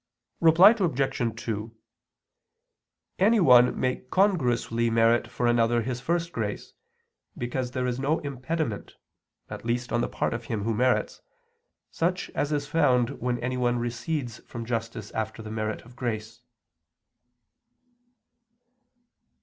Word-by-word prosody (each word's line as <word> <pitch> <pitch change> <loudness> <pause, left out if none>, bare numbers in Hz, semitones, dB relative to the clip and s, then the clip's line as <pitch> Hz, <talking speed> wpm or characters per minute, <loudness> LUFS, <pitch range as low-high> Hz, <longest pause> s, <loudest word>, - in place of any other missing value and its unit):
Reply 170 +5 +8
Obj. 135 - -1
2: 110 0 -4 1.4
Anyone 175 - +5
may 130 0 0
congruously 125 - +1
merit 115 +1 +3
for 120 - -3
another 120 0 +3
his 125 +1 -4
first 170 +3 -1
grace, 105 -6 -4 0.6
because 120 +1 -3
there 125 0 -2
is 125 0 -2
no 145 +4 +1
impediment 140 -3 -4 0.5
(at - - -8
least, 120 +2 -2
on 120 - +2
the - - 0
part - - -1
of 115 0 -5
him 110 -3 -3
who 115 +1 0
merits), 125 +4 +1 0.7
such 180 +2 -1
as 145 - -2
is 145 -1 0
found 130 -6 +2
when 125 0 0
anyone 125 -1 0
recedes 120 +1 -3
from 115 -1 -8
justice 115 -2 -4
after 110 +1 -4
the 110 - -7
merit 110 -1 -3
of 120 +1 -16
grace. 115 -2 -4
120 Hz, 125 wpm, -26 LUFS, 115-145 Hz, 1.4 s, Reply